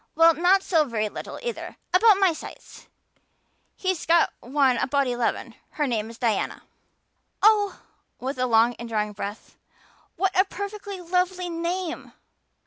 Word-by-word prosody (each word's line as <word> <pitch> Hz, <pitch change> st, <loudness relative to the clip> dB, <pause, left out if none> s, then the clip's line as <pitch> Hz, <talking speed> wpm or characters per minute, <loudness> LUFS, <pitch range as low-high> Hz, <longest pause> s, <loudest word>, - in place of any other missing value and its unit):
Well, 330 Hz, +1 st, +6 dB
not 365 Hz, +4 st, +3 dB
so 325 Hz, -4 st, +3 dB
very 220 Hz, -6 st, -2 dB
little -, -, -7 dB
either 475 Hz, -1 st, -5 dB, 0.2 s
about 410 Hz, +2 st, +6 dB
my 385 Hz, -3 st, +3 dB
size." -, -, -11 dB, 0.9 s
"He's 375 Hz, -3 st, -2 dB
got 335 Hz, 0 st, +4 dB
one 265 Hz, 0 st, +2 dB
about 280 Hz, 0 st, +1 dB
eleven. 245 Hz, -2 st, -2 dB, 0.2 s
Her 300 Hz, -, 0 dB
name 225 Hz, -4 st, -2 dB
is 230 Hz, -, -11 dB
Diana." 235 Hz, -3 st, -1 dB, 0.8 s
"Oh!" 415 Hz, -1 st, +4 dB, 0.4 s
with 260 Hz, +1 st, -4 dB
a 255 Hz, -, +1 dB
long 230 Hz, +1 st, +4 dB
indrawing 220 Hz, -3 st, -2 dB
of 210 Hz, -, -12 dB
breath. 205 Hz, +1 st, -7 dB, 0.6 s
"What 385 Hz, 0 st, 0 dB
a 375 Hz, -, +6 dB
perfectly 405 Hz, 0 st, -6 dB
lovely 360 Hz, +1 st, -1 dB
name!" 340 Hz, +1 st, -4 dB
330 Hz, 140 wpm, -25 LUFS, 245-375 Hz, 0.9 s, Well